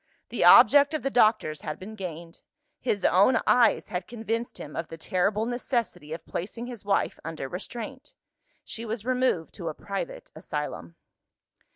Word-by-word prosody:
The - - -1
object 285 +1 +8
of 310 - -3
the 275 - -1
doctors 215 - +3
had 155 - -5
been 205 +4 -9
gained. 170 -4 -8 0.4
His 200 -3 -1
own 200 +7 +5
eyes 235 -3 +4
had 180 +1 -4
convinced 230 +1 -3
him 150 - -9
of 165 - -3
the 165 - -9
terrible 200 +5 0
necessity 235 - -2
of 160 0 -6
placing 225 +7 -5
his 245 -4 -8
wife 200 -1 0
under 160 -4 -5
restraint. 240 - -7 0.5
She 230 - -5
was 225 -1 -4
removed 255 -10 0
to 170 -3 -5
a 155 - -6
private - - -6
asylum. 85 - -5
210 Hz, 160 wpm, -27 LUFS, 165-240 Hz, 0.5 s, object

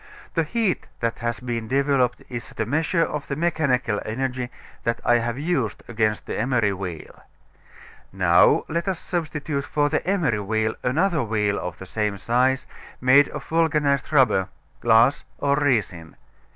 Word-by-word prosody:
The 165 - +2
heat 200 +4 -1
that 115 0 -2
has 120 -1 -2
been 120 -3 -4
developed 135 -1 +1
is 120 -1 -6
the 110 - -3
measure 160 - +1
of 150 -3 -4
the 140 - -2
mechanical 140 -9 0
energy 125 +2 -3 0.3
that 115 - -1
I 120 - +5
have 120 +1 -2
used 140 - -1
against 110 -2 0
the - - -4
emery 115 -3 +1
wheel. 90 -4 -7 0.9
Now, - - +4
let 170 +3 -2
us 190 -3 0
substitute 155 -5 -3
for 145 +1 +1
the - - 0
emery 175 - +1
wheel 110 +2 0
another 160 +5 +1
wheel 105 -3 0
of 90 -1 -5
the 95 - -9
same 105 +1 -2
size 125 +5 +1 0.3
made 135 +3 +6
of - - -7
vulcanized 150 -4 +1
rubber, 115 -10 +3 0.3
glass 115 +3 +4
or 140 0 +1
resin. 105 - 0
125 Hz, 150 wpm, -23 LUFS, 110-150 Hz, 0.9 s, made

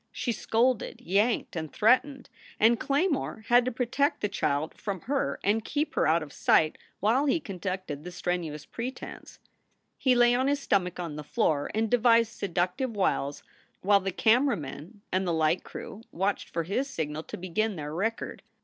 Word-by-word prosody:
She 250 -1 -2
scolded, 235 +1 0
yanked, 205 +6 +1
and 160 -2 -4
threatened, 255 +4 +2 0.3
and 230 +2 +5
Claymore 280 - 0
had 240 0 +6
to 255 - 0
protect 255 +5 0
the 210 - 0
child 150 -4 -1
from 195 -4 -5
her 275 +1 -1
and 215 +2 +2
keep 300 +4 -2
her - - +2
out 160 +1 +3
of 145 - -11
sight 155 -1 +3 0.2
while 240 +8 +2
he 285 - +2
conducted 185 - -5
the 180 - -7
strenuous 165 -4 -3
pretense. 245 +3 -7 0.6
He 255 -2 +3
lay 240 0 +5
on 260 +2 +2
his 285 0 +1
stomach 180 -9 0
on 165 -4 -4
the 150 - -5
floor 145 0 0
and 220 +1 +1
devised 230 -1 +4
seductive 185 +6 -1
wiles 145 -7 0 0.4
while 200 +1 +5
the 195 0 -3
camera 240 +6 +3
men 165 - -9
and 185 0 0
the 170 - +1
light 160 +2 +2
crew 215 - -8
watched 195 +3 -1
for 165 - -2
his 250 - -1
signal 155 - -3
to - - -8
begin 195 +4 -1
their 150 -2 -5
record. 220 +7 -2
205 Hz, 175 wpm, -28 LUFS, 170-245 Hz, 0.6 s, had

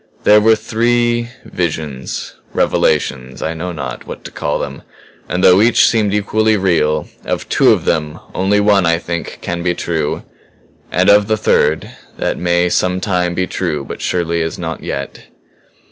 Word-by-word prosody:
"There 105 0 +6
were 110 +1 +5
three 120 +1 0 0.2
visions, 75 -6 -4 0.2
revelations 65 -1 0
I 80 - -1
know 85 +3 -4
not 65 -7 -6
what - - -8
to - - -9
call 75 - -2
them. - - -5 0.5
And 90 +1 -1
though 90 +2 +7
each 120 +2 +5
seemed 110 -3 +2
equally 110 +1 +1
real, 80 -5 +1 0.2
of - - -3
two - - +4
of - - +1
them, 75 0 -1
only 100 +2 +2
one, 100 -3 +3
I 85 0 +3
think, 85 0 -5
can 85 0 -3
be 90 0 0
true; 80 -4 -2 0.7
and 90 +2 +2
of 100 0 +5
the 110 - +1
third - - +1 0.3
that - - -2
may 85 0 +2
some 90 +1 +1
time 90 -3 0
be 90 - 0
true - - -3
but - - -7
surely 85 -1 0
is 80 0 -3
not 80 -2 -5
yet." 70 -1 -5
90 Hz, 165 wpm, -16 LUFS, 80-105 Hz, 0.7 s, though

